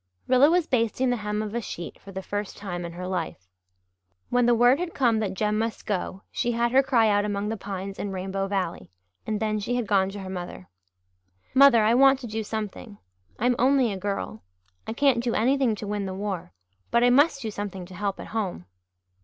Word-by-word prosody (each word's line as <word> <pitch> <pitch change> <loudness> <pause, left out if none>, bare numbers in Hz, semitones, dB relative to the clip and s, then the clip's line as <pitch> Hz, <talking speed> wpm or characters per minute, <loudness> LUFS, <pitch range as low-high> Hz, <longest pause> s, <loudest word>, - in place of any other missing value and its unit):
Rilla 260 +3 +6
was 350 0 +3
basting 245 0 +1
the 245 - 0
hem 210 0 -2
of 210 -1 -6
a 235 - -1
sheet 175 -5 -7
for 195 - -11
the 190 0 -6
first 205 +1 -4
time 175 -4 -5
in 170 - -7
her 180 +1 -6
life. 165 - -4 0.8
When 245 -1 +3
the 240 - +5
word 245 +4 +5
had 355 -1 -4
come 235 -5 +3
that 200 -3 -2
Jem 210 +2 0
must 225 0 -3
go 195 -1 -3
she 240 - -1
had 235 +1 +1
her 265 +2 +6
cry 245 -5 +3
out 205 -1 +3
among 205 0 -2
the 225 - -1
pines 195 -1 -6
in 200 - -3
Rainbow 195 +1 -3
Valley 190 -4 -3 0.4
and 215 -1 -1
then 215 -1 0
she 240 +4 -2
had 245 -2 -1
gone 195 -2 +2
to 200 0 -7
her 190 - -7
mother. 175 - -7 0.9
"Mother, 260 -5 +7
I 220 +2 +4
want 270 +2 +6
to - - -6
do 220 -1 -3
something. 210 0 -6 0.4
I'm 245 +2 +2
only 260 -2 +3
a - - -3
girl 195 - -4 0.5
I 220 - -3
can't 250 -2 +2
do 235 -1 0
anything 255 -1 +2
to 210 - -7
win 205 -1 -2
the 185 - -5
war 195 -3 -4 0.4
but 235 0 +3
I 245 - +5
must 280 +1 +4
do 220 - -3
something 200 -3 -5
to 185 - -13
help 200 +1 -3
at - - -8
home." 190 - -3
215 Hz, 220 wpm, -26 LUFS, 195-240 Hz, 0.9 s, Mother